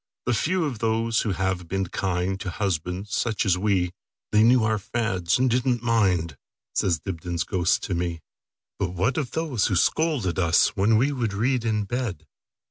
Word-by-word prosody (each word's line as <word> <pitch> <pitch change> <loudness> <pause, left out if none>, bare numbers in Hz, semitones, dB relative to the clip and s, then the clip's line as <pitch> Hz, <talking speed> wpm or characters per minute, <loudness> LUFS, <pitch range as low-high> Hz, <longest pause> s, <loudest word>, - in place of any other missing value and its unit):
The 120 - +1
few 165 - +1
are 145 - -1
those 115 0 0
who 105 - -1
have 95 -1 -2
been 95 +2 -1
kindTo 95 +2 -2
husbands 90 +1 -3
such 110 -3 0
as 95 -3 +3
we; 90 -2 +1 0.4
They 105 - +4
knew 120 +1 +5
our 110 -1 +1
fads, 95 -5 0
and 130 +1 +2
did 125 +2 +1
n't 120 -2 +1
mind,"Says 90 - -1
Dibdin's 85 -2 -3
ghost 90 -2 0
to 95 - -2
me."But 85 0 -6
what 100 - +1
of 135 -5 -3
those 155 -10 0
who 95 - 0
scold 155 - +1
at 85 - -1
usWhen 95 +5 +3
we 135 +6 +2
would 120 -7 -2
read 120 +4 0
in 105 -2 +1
bed? 100 - -4
100 Hz, 170 wpm, -25 LUFS, 90-120 Hz, 0.4 s, knew